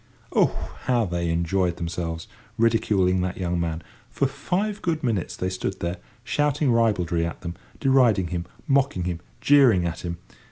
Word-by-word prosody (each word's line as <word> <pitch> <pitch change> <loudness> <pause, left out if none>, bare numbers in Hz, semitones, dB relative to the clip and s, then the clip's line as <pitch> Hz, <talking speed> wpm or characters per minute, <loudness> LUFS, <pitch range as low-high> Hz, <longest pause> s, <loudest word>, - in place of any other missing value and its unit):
Oh, - - +1
how 120 -3 +2
they 85 -2 -2
enjoyed 85 +1 +1
themselves, 85 -1 -4 0.3
ridiculing 105 -5 +3
that 90 0 -2
young 90 -2 -1
man! 85 -1 -2 0.3
For 140 - 0
five 185 +10 -2
good 160 -3 -1
minutes 110 -8 -1
they 90 0 -2
stood 95 +1 -3
there, 85 +1 -2 0.3
shouting 145 0 +1
ribaldry 95 -8 +2
at 85 +1 -4
him, 85 -1 -4 0.3
deriding 125 - +4
him, 85 -1 -3 0.2
mocking 135 -9 +2
him, 85 -1 -2 0.2
jeering 130 -11 +5
at 85 0 -3
him. 85 -1 -4
95 Hz, 155 wpm, -25 LUFS, 85-130 Hz, 0.3 s, jeering